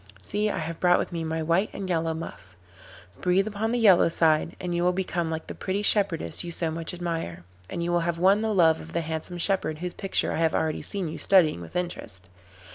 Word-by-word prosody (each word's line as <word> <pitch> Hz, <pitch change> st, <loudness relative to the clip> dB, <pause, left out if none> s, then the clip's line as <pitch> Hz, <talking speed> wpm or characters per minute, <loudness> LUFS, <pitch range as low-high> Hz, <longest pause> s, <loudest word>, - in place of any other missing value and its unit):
See, 210 Hz, -, -1 dB
I -, -, -3 dB
have 165 Hz, 0 st, -4 dB
brought 180 Hz, -1 st, +4 dB
with -, -, -3 dB
me 170 Hz, -1 st, -3 dB
my 160 Hz, 0 st, -2 dB
white 170 Hz, +6 st, +1 dB
and 195 Hz, -, -5 dB
yellow 165 Hz, -2 st, 0 dB
muff. 100 Hz, -, -9 dB, 0.7 s
Breathe 185 Hz, +2 st, +2 dB
upon 215 Hz, +1 st, -2 dB
the 245 Hz, -, +1 dB
yellow 200 Hz, -8 st, +6 dB
side 160 Hz, -1 st, +2 dB
and 180 Hz, -1 st, -3 dB
you 175 Hz, -, 0 dB
will 180 Hz, 0 st, +3 dB
become 175 Hz, -3 st, -2 dB
like 160 Hz, 0 st, -4 dB
the -, -, -7 dB
pretty 200 Hz, +2 st, -3 dB
shepherdess 195 Hz, -, +3 dB
you 175 Hz, -, -6 dB
so 165 Hz, -1 st, -1 dB
much 165 Hz, 0 st, -3 dB
admire, 165 Hz, -, -4 dB, 0.3 s
and 170 Hz, -, -3 dB
you 175 Hz, -, -1 dB
will 175 Hz, -, +3 dB
have 170 Hz, 0 st, -1 dB
won 195 Hz, +4 st, +4 dB
the 220 Hz, 0 st, 0 dB
love 165 Hz, -5 st, +4 dB
of 165 Hz, -, -11 dB
the 170 Hz, -, 0 dB
handsome 160 Hz, +2 st, -5 dB
shepherd 175 Hz, -3 st, 0 dB
whose 180 Hz, +2 st, -4 dB
picture 195 Hz, -, -1 dB
I -, -, -2 dB
have 160 Hz, -1 st, +1 dB
already 160 Hz, -1 st, -1 dB
seen 195 Hz, -4 st, -3 dB
you 155 Hz, -, -6 dB
studying 170 Hz, -, +4 dB
with 85 Hz, -, -11 dB
interest. 95 Hz, -, -4 dB
170 Hz, 230 wpm, -26 LUFS, 160-190 Hz, 0.7 s, yellow